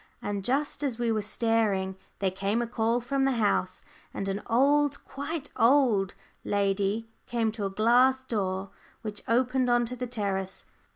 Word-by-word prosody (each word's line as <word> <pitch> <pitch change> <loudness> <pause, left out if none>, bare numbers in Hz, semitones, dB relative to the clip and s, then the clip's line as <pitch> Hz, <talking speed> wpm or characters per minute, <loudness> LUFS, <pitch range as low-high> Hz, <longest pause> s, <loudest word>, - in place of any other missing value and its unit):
And 200 -1 -3
just 285 +5 0
as 260 -5 -1
we 240 -1 0
were 215 -1 +1
staring, 210 -3 0 0.2
there 195 -2 0
came 200 +4 -1
a 240 - 0
call 230 +1 0
from 270 +3 0
the 270 0 +3
house, 205 -5 0 0.3
and 195 - -3
an 195 +1 -2
old, 285 +4 +2
quite 285 +2 -5
old, 230 -7 +3 0.3
lady 200 +2 0 0.2
came 230 -2 0
to 215 -2 -4
a - - 0
glass 245 +6 +4
door 195 -5 -2 0.3
which 210 -2 -5
opened 250 +2 +2
on 240 0 +3
to 250 +2 -5
the 250 0 -4
terrace. 195 -5 -3
225 Hz, 165 wpm, -28 LUFS, 200-250 Hz, 0.3 s, glass